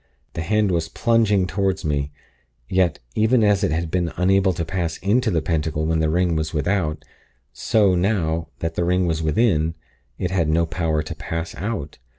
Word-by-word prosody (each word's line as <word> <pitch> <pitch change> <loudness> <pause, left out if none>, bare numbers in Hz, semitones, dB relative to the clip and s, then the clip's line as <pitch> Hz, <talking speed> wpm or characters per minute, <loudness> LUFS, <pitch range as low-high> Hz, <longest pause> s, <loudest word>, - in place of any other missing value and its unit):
The - - -3
hand 105 +3 +1
was 85 -2 -1
plunging 105 -2 +2
toward 95 -1 -1
me; 70 -1 -1 0.6
yet, 90 -1 +1 0.2
even 110 +2 +3
as 105 -1 +3
it 95 - +2
had 80 +1 -2
been 85 -3 0
unable 95 +1 +3
to 85 -1 -3
pass 85 -1 -2
into 110 +5 +1
the 80 -6 0
Pentacle 80 -1 -1
when 80 0 +1
the 80 -1 +1
ring 85 +1 +1
was 80 0 -2
without, 75 -3 -1 0.5
so, 105 -4 +2
now 85 -4 0
that 80 0 -2
the 85 - -1
ring 90 +1 +2
was 80 -2 -1
within, 80 -1 +1 0.4
it 90 - -2
had 85 -5 +1
no 85 +2 +2
power 80 -2 -1
to - - -6
pass 80 +1 -5
out. 95 -8 -5
85 Hz, 180 wpm, -22 LUFS, 80-95 Hz, 0.6 s, even